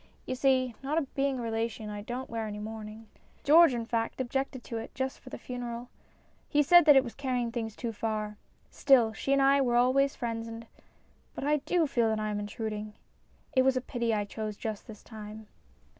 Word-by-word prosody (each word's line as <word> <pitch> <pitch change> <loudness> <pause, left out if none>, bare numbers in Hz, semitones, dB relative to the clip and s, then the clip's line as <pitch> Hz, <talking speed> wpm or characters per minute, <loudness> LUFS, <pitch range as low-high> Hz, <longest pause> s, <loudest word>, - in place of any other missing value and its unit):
" - - -34
You - - -3
see, 255 -1 +2
not 285 +1 -2
being 275 -1 0
a 245 - -4
relation, 225 -1 -3
I 205 0 -5
don't 245 +5 -5
wear 225 -1 -3
any 210 0 -5
mourning. 215 +1 -7 0.4
George, 325 +1 +7
in 230 -1 -3
fact, 230 +1 -2
objected 260 0 -2
to 230 - -5
it 225 - -9
just 265 0 -3
for 255 - -12
the - - -7
funeral. 245 -1 -6 0.6
He 295 -1 +3
said 345 +3 +7
that 295 -2 +8
it 270 - +6
was 240 - -7
carrying 250 -4 -2
things 225 -2 -4
too 235 -2 -4
far. 215 -1 -3 0.4
Still, 240 -5 +4
she 270 - -3
and 275 0 +4
I 275 +1 +5
were 245 -3 +1
always 260 +3 +3
friends 230 -2 -3
and 230 0 -8 0.7
But - - -5
I 300 +1 +3
do 335 +3 +1
feel 240 -5 +1
that 220 0 0
I 215 0 -2
am 205 - -2
intruding. 210 0 -5 0.6
It 260 - +6
was 260 0 +3
a - - +3
pity 235 -2 -2
I 210 -2 0
chose 215 0 -5
just 220 -2 -5
this 215 -2 -11
time." 215 0 -9
235 Hz, 210 wpm, -29 LUFS, 220-265 Hz, 0.7 s, that